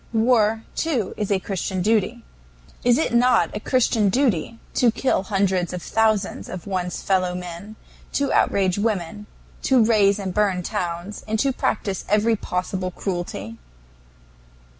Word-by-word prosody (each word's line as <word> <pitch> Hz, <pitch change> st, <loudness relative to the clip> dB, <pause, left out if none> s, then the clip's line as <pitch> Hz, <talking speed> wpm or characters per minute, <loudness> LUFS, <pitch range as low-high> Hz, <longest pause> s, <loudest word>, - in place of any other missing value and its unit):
War, 225 Hz, -1 st, +3 dB
too, 265 Hz, -, -1 dB
is 210 Hz, -, -3 dB
a 200 Hz, -, +4 dB
Christian 190 Hz, -1 st, -3 dB
duty. 225 Hz, +3 st, +1 dB, 0.6 s
Is 245 Hz, 0 st, +4 dB
it 315 Hz, -, 0 dB
not 245 Hz, -1 st, +3 dB
a -, -, -2 dB
Christian 225 Hz, -3 st, +2 dB
duty 230 Hz, -, +1 dB, 0.2 s
to 245 Hz, -, +4 dB
kill 255 Hz, +1 st, +1 dB
hundreds 190 Hz, -3 st, 0 dB
of 180 Hz, -, -5 dB
thousands 220 Hz, -3 st, 0 dB
of 185 Hz, -3 st, -7 dB
one's 185 Hz, -2 st, -3 dB
fellow 185 Hz, -2 st, +1 dB
men, 180 Hz, +4 st, -7 dB, 0.4 s
to 280 Hz, -1 st, 0 dB
outrage 190 Hz, -1 st, +2 dB
women, 210 Hz, -1 st, -2 dB, 0.3 s
to 260 Hz, -4 st, +4 dB
raze 205 Hz, -3 st, +4 dB
and 190 Hz, -3 st, -4 dB
burn 195 Hz, -3 st, +1 dB
towns, 175 Hz, +4 st, -4 dB
and 220 Hz, 0 st, 0 dB
to 270 Hz, +5 st, +2 dB
practice 195 Hz, -5 st, -2 dB
every 215 Hz, +2 st, +3 dB
possible 185 Hz, -1 st, -3 dB
cruelty? 175 Hz, -, -5 dB
205 Hz, 140 wpm, -23 LUFS, 185-225 Hz, 0.6 s, a